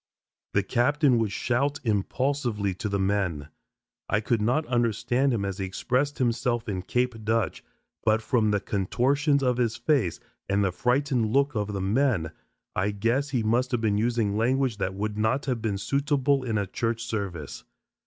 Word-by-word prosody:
The 100 - +3
captain 130 - +2
would 110 -3 0
shout 135 +6 0
impulsively 115 -1 0
to 105 +4 -4
the 100 - 0
men; 95 -7 -1 0.6
I 105 - +2
could 110 0 0
not 125 +9 +1
understand 120 +2 +1
him 105 -5 -1
as 100 -1 -4
he 95 - -1
expressed 130 +9 -1
himself 120 -1 0
in 95 -3 -2
"Cape 125 +1 -1
Dutch," 110 +1 0 0.4
but 110 0 +2
from 110 -2 +2
the 105 -1 +2
contortions 140 - +1
of 125 -2 +2
his 120 -3 +1
face 135 - +1 0.3
and 100 +1 +2
the 95 - +1
frightened 125 +1 +1
look 140 +3 +2
of 105 -2 -2
the 100 - -2
men, 105 - +1 0.4
I 95 +3 +1
guess 115 +8 0
he 125 -4 0
must 120 +4 +1
have 120 - +1
been 105 -2 +1
using 115 -3 +1
language 125 +1 +1
that 95 -2 -2
would 105 +1 -3
not 110 +6 +1
have 125 -4 -1
been 105 -3 -1
suitable 140 +3 +1
in 115 -4 -1
a 100 - 0
church 115 +4 -2
service. 100 - -4
115 Hz, 175 wpm, -26 LUFS, 100-130 Hz, 0.6 s, The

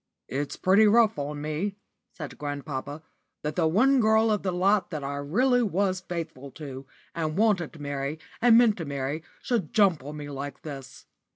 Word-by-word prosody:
"It's 140 +2 -3
pretty 200 +4 +5
rough 220 -4 +4
on 145 +1 -4
me," 160 +7 -2 0.4
said 150 -5 -8
grandpapa, 145 0 -5 0.4
"that 150 0 -2
the 165 -2 +2
one 255 +11 +4
girl 220 0 +4
of 210 - +1
the 190 - -1
lot 185 +1 +2
that 155 -4 -5
I 140 +1 -3
really 245 - +2
was 190 -3 0
faithful 165 -6 -6
to, 135 -3 -8 0.3
and 155 0 -2
wanted 205 -7 +2
to 155 - -12
marry, 140 +1 -3 0.2
and 230 -1 +7
meant 235 -3 +5
to 165 - -4
marry, 140 +2 -3 0.2
should 220 - -1
jump 195 -10 +4
on 150 +2 -7
me 145 -1 -6
like 140 -1 -6
this. 135 -4 -9
160 Hz, 180 wpm, -27 LUFS, 145-205 Hz, 0.4 s, and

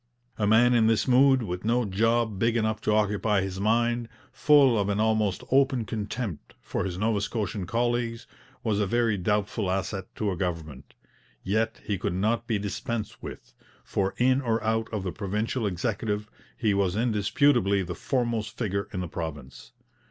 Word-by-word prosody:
A 105 - +2
man 120 +3 +5
in 115 -2 +4
this 115 +2 +2
mood, 130 0 +5
with 90 -3 -4
no 120 +2 +1
job 110 +1 +1
big 115 +2 +2
enough 110 -1 0
to - - 0
occupy 105 -1 +2
his 95 0 -4
mind, 115 +2 +1 0.2
full 145 -5 +5
of 100 0 0
an 100 0 0
almost 110 -3 +1
open 130 -3 +3
contempt 105 - -5
for - - -3
his 90 -2 -4
Nova 105 0 +1
Scotian 105 -3 -3
colleagues, 120 +1 -1 0.4
was 105 -2 0
a 105 - +1
very 115 0 +2
doubtful 105 +1 -1
asset 95 0 -2
to 105 -2 -1
a - - -2
government. 80 -7 -5 0.5
Yet 110 +3 -1
he 100 -4 -2
could 100 -3 -2
not 115 +5 0
be 110 - +1
dispensed 105 +2 -4
with, - - -9 0.3
for 95 -1 -1
in 130 +2 +3
or 115 -3 0
out 110 0 0
of 105 -3 -3
the 90 - -2
provincial 105 +4 -2
Executive 105 +2 -2 0.3
he 110 -3 +1
was 100 -2 +1
indisputably 110 -1 +2
the 90 0 -5
foremost 120 0 -2
figure 100 -4 -2
in 90 - -3
the 90 - -3
province. 75 -5 -7
110 Hz, 170 wpm, -27 LUFS, 100-115 Hz, 0.5 s, man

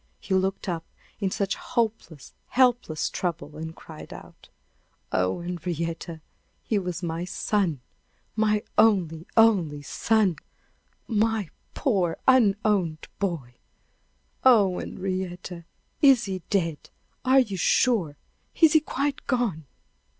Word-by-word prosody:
He 195 - -4
looked 190 +2 0
up 170 -3 -2 0.4
in 195 -2 0
such 200 0 -1
hopeless, 230 - -3
helpless 245 - +2
trouble, 170 -4 -4
and 160 +1 -7
cried 155 -2 -11
out: - - -13 0.6
"Oh, 95 - 0
Henrietta! 170 -1 -4 0.4
he 215 - 0
was 180 -1 -4
my 165 0 -2
son 180 -5 -1 0.5
my 215 -1 +2 0.2
only, 180 -7 +3
only 180 -11 +4
son! 205 -1 +1 0.7
My 220 -4 0 0.2
poor, 190 - +1
unowned 205 -9 +2
boy! 165 -11 -3 0.9
Oh, 205 -8 +5
Henrietta! 185 -2 -5 0.4
is 270 -4 +6
he 190 -2 -4
dead? 165 -6 -1 0.3
Are 265 +1 +5
you 210 -6 -3
sure? 185 - +2 0.4
Is 320 -3 +6
he 315 - +7
quite 285 -1 -3
gone?" 220 - -1
190 Hz, 110 wpm, -26 LUFS, 165-225 Hz, 0.9 s, he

